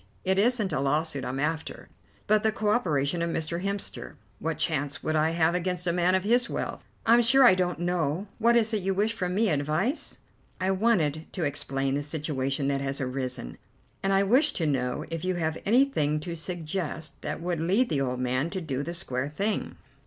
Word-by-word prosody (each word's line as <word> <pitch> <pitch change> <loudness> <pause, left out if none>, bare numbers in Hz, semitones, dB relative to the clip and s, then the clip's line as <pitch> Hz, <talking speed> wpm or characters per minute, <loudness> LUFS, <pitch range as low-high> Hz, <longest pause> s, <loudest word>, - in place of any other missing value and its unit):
It 190 +1 +2
isn't 215 -4 +2
a 135 - 0
lawsuit 145 +1 0
I'm 130 +2 -3
after, 160 +2 -3 0.4
but 215 0 +3
the 220 - +2
co 215 -1 -1
operation 165 - +1
of 170 - 0
Mr. 165 +1 -2
Hemster. 200 0 -4 0.2
What - - -2
chance 145 +1 -1
would 155 - 0
I 155 +1 +3
have 165 0 +2
against 180 0 -1
a 170 - +1
man 180 +1 +3
of 190 - +1
his 240 +4 +2
wealth?" - - -4 0.2
"I'm 235 +2 +6
sure 265 +4 +5
I 240 - +8
don't 180 -2 0
know. 175 0 -1
What 235 +1 +4
is 225 -1 +3
it 210 - +1
you 190 +1 0
wish 215 +3 +1
from 180 -4 -2
me? 220 +1 +3
Advice?" 155 - -1 0.4
"I 185 +1 +1
wanted 180 -7 +1
to 180 - -2
explain 135 -2 -1
the 145 - 0
situation 145 -2 -1
that 140 -1 0
has 135 0 -2
arisen, 130 - -4 0.4
and 195 - 0
I 195 0 +4
wish 250 +10 +4
to 165 - -1
know 125 -4 -1
if 165 0 -3
you 185 0 0
have 160 -2 -1
anything 210 - +3
to 170 +2 -5
suggest 165 -1 -4
that - - -4
will 170 -1 -2
lead 195 +10 +2
the 140 -3 0
old 125 -2 -1
man 130 +5 0
to 190 - -3
do 140 -6 -3
the 170 +4 -4
square 130 -5 -2
thing?" 200 +8 -2
170 Hz, 205 wpm, -27 LUFS, 145-195 Hz, 0.4 s, I